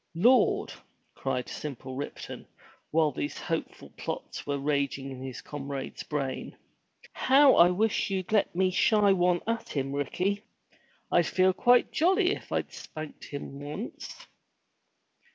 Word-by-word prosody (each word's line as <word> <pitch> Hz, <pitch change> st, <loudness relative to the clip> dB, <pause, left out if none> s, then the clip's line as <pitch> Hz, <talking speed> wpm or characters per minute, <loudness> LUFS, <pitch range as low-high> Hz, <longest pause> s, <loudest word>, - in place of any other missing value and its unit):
"Lord!'* 235 Hz, +7 st, +4 dB, 0.4 s
cried 125 Hz, -, -2 dB
simple 130 Hz, -3 st, -6 dB
Ripton, 140 Hz, +2 st, -6 dB, 0.4 s
while 155 Hz, -1 st, +3 dB
these 145 Hz, +2 st, -4 dB
hopeful 165 Hz, -1 st, -4 dB
plots -, -, -5 dB
were 140 Hz, 0 st, 0 dB
raging 140 Hz, -1 st, -1 dB
in 130 Hz, -1 st, -8 dB
his 130 Hz, -1 st, -6 dB
comrade's 140 Hz, -2 st, -6 dB
brain. 140 Hz, -3 st, -4 dB, 0.6 s
How 270 Hz, +1 st, +6 dB
I 175 Hz, -, +7 dB
wish 205 Hz, +4 st, +1 dB
you'd 190 Hz, -1 st, -3 dB
have -, -, -2 dB
let -, -, -33 dB
me 185 Hz, +1 st, +2 dB
shy 205 Hz, +1 st, +4 dB
one 180 Hz, -1 st, +2 dB
at 230 Hz, 0 st, -2 dB
him, 135 Hz, -1 st, -2 dB
Ricky! 180 Hz, +8 st, -1 dB, 0.7 s
I'd 175 Hz, -, +4 dB
feel 185 Hz, 0 st, +3 dB
quite 245 Hz, +6 st, +4 dB
jolly 365 Hz, +3 st, +3 dB
if -, -, -6 dB
I'd -, -, -2 dB
spanked 155 Hz, -1 st, -8 dB
him 140 Hz, -1 st, -7 dB
once." 150 Hz, -, -7 dB
165 Hz, 135 wpm, -28 LUFS, 140-205 Hz, 0.7 s, I